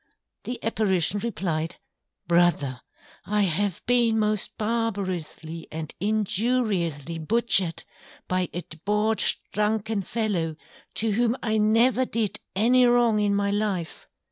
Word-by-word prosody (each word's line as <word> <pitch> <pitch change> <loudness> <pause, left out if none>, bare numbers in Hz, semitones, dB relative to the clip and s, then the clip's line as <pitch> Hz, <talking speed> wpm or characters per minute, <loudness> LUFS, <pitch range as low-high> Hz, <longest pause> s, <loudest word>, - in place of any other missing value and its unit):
_ - - -43 0.4
The 245 - -3
Apparition 205 -4 +1
replied, 170 -8 -2 0.5
_Brother, 170 -7 +2 0.4
I 210 +1 0
have 190 +1 0
been 235 -2 +3
most 215 -2 0
barbarously 190 -8 -3
and 155 -1 -5
injuriously 200 - 0
Butchered, 190 -1 +2 0.4
by 185 -1 0
a 175 - -4
Debauched 210 +7 0
Drunken 215 0 0
Fellow, 190 -7 -2 0.4
to 225 0 +1
whom 235 +3 +1
I 220 -1 +1
never 230 +4 +4
did 220 -4 -1 0.2
any 245 +5 +4
wrong 240 -3 +3
in 205 -1 +2
my 200 0 +1
Life. 200 -5 -2
210 Hz, 115 wpm, -25 LUFS, 175-225 Hz, 0.5 s, never